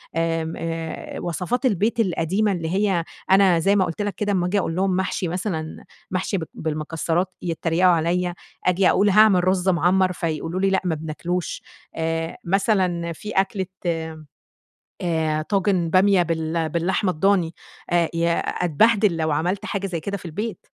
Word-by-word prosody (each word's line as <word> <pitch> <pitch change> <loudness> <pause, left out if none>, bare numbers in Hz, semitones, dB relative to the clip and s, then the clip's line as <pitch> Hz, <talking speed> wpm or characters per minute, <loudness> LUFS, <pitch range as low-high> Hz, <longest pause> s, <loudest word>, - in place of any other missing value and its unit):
آمم 165 0 -1
آآ 165 -1 -5
وصفات 180 - -2
البيت 220 0 +1
القديمة 195 +1 +1
اللي 170 -4 -2
هي، 190 -2 +1 0.3
أنا 190 -3 +5
زي 195 +5 +3
ما 190 -2 +3
قُلت 170 +4 -4
لك 205 -1 -2
كده، 205 -1 -1
أما 180 -3 +1
آجي 200 +3 +1
أقول 165 -3 -2
لهم 190 0 +1
محشي 185 -1 -1
مثلًا، 170 -2 -4 0.3
محشي 190 +2 -1
ب 170 - -3
بالمكسرات، 160 +3 -2
يتريقوا 170 +1 +2
عليَّا، 175 +2 +1 0.3
أجي 180 +1 +4
أقول: 205 +1 +3
"هاعمل 200 -3 +5
رز 185 0 +2
مَعمّر." 185 +1 +3
فيقولوا 165 +1 -2
لي: 195 - +3
"لأ، 190 - +1
ما 175 -3 0
بناكلوش." 160 +3 -4 0.3
آآ 165 0 -2
مثلًا 180 -3 +1
فيه 210 +6 -7
أكلة، 190 0 +1 1.4
آآ 160 -3 0
طاجن 185 -1 +1
بامية 190 +1 +4
بال 160 -1 -1
باللحمة 180 +4 0
الضاني، 180 0 +1 0.4
آآ 170 -1 +2
يا 170 0 +1
أتبهدل 200 +2 +2
لو 160 -1 0
عملَت 175 +6 -1
حاجة 200 -1 -2
زي 175 -3 -3
كده 200 +5 -4
في 180 - -14
البيت. 205 +7 -5
180 Hz, 155 wpm, -23 LUFS, 165-195 Hz, 1.4 s, أنا